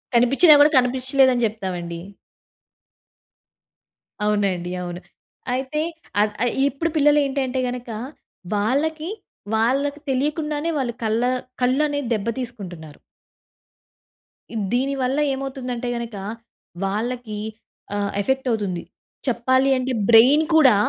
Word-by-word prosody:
కనిపించినా 275 +7 +6
గూడా 295 +2 +6
కనిపించలేదు 260 +1 +3
అని 240 - 0
జెప్తామండి. 180 -6 -4 2.3
అవునండి. 195 -4 0
అవును. 175 0 -6 0.5
అయితే 265 +4 -2 0.4
అద్ 210 0 +1
అయి 240 - 0 0.2
ఇప్పుడు 280 +5 -2
పిల్లలేంటంటే 280 -3 +2
గనక. 245 -1 -6 0.7
వాళ్ళకి 305 - 0 0.5
వాళ్ళకి 275 +6 +1
తెలియకుండానే 300 +3 -1
వాళ్ళు 250 -4 -1
కళ్ళ 220 +1 +1 0.4
కళ్ళనేది 285 +1 +1
దెబ్బ 215 -1 -2
తీసుకుంటున్నారు. 180 - -7 1.5
ఇ - - -6 0.2
దీని 270 +3 +1
వల్ల 260 +3 0
ఏమవుతుందంటే 260 -3 -4
గనక. 235 -2 -6 0.7
వాళ్ళకీ 220 +2 -3 0.6
ఆహ్, 200 -1 -1
ఎఫెక్ట్ 265 +3 -1
అవుతుంది. 200 -6 -2 0.4
చెప్పాలి 260 +2 +2
అంటే 255 0 -1 0.2
బ్రైన్ 255 +7 +7
కూడా 270 -8 +7
250 Hz, 100 wpm, -22 LUFS, 220-275 Hz, 2.3 s, బ్రైన్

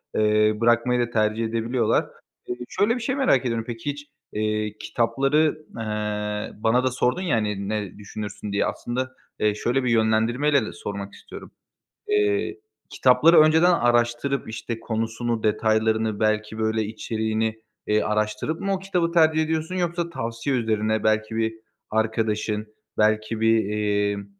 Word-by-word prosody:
eee, 105 0 +3
bırakmayı 120 +1 +3
da 120 -1 0
tercih 110 0 +1
edebiliyorlar. 115 +1 +1 0.4
Eee, 125 - -3
şöyle 220 +4 +1
bir 245 - -4
şey 255 +3 -1
merak 265 - +3
ediyorum. 115 -2 -1
Peki, 120 +3 -5
hiç, 145 +1 -6 0.3
eee, 105 0 -1
kitapları, 150 +6 +1
eee, 105 -1 -3
bana 125 +3 +3
da 130 - +1
sordun, 125 +6 0
ya, 180 -9 +1
hani, 105 -3 -2
ne 105 -3 -3
düşünürsün 105 0 -7
diye. 100 - +1
Aslında, 130 +2 -3 0.3
eee, 105 -1 +2
şöyle 125 +5 0
bir 125 - 0
yönlendirmeyle 115 +5 +2
de - - -7
sormak 100 +2 -6
istiyorum. - - -11 0.6
Eee, 415 -1 +1 0.3
kitapları 135 +7 +5
önceden 160 +3 +5
araştırıp, 120 -1 +1
işte, 115 +1 -5
konusunu, 115 0 -2
detaylarını, 110 0 +1
belki, 110 0 0
böyle, 110 0 0
içeriğini, 110 0 -2 0.2
eee, 105 0 +2
araştırıp 105 +9 -1
mı 195 0 -1
o - - -2
kitabı 180 -3 -1
tercih 160 -2 +4
ediyorsun 160 +2 -2
yoksa 175 -1 -1
tavsiye 115 -1 -2
üzerine, 110 -1 0
belki 110 +1 +1
bir 110 0 0 0.4
arkadaşın, 110 -1 -1 0.3
belki 110 +1 +1
bir, 115 -2 +3
emm, 105 -1 0
115 Hz, 145 wpm, -24 LUFS, 110-135 Hz, 0.6 s, kitapları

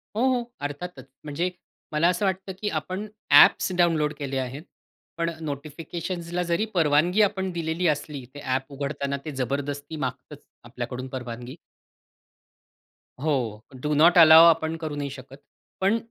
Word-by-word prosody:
हो, 220 - 0
हो. 245 - -1 0.2
अर्थातच. 145 +5 -6 0.2
म्हणजे 155 +4 -2 0.4
मला 150 +3 +3
असं 180 +3 0
वाटतं 190 0 -2
की 210 - 0
आपण 185 +5 -4 0.2
ॲप्स - - +7
डाउनलोड 160 -4 +2
केले 140 -2 -3
आहेत, 130 +3 -4 0.5
पण 170 0 0
नोटिफिकेशन्सला 165 +4 -4
जरी 175 +4 0
परवानगी 170 +4 +3
आपण 190 -2 +1
दिलेली 170 +1 -1
असली, 150 -2 -2
ते 145 - -9
ॲप 130 0 -2
उघडताना 140 0 -3
ते 155 - -4
जबरदस्ती 140 +3 -3
मागतच 135 +1 -6 0.2
आपल्याकडून 125 +1 -6
परवानगी 125 0 -7 1.7
हो. 125 -8 -1 0.2
डू 150 +2 -1
नॉट 170 +4 +6
अलाउ 160 0 +10
आपण 160 -1 +3
करू 155 -2 -4
नाही 145 -1 -3
शकत. 135 0 -11 0.4
पण 195 +4 +3
150 Hz, 140 wpm, -25 LUFS, 140-170 Hz, 1.7 s, अलाउ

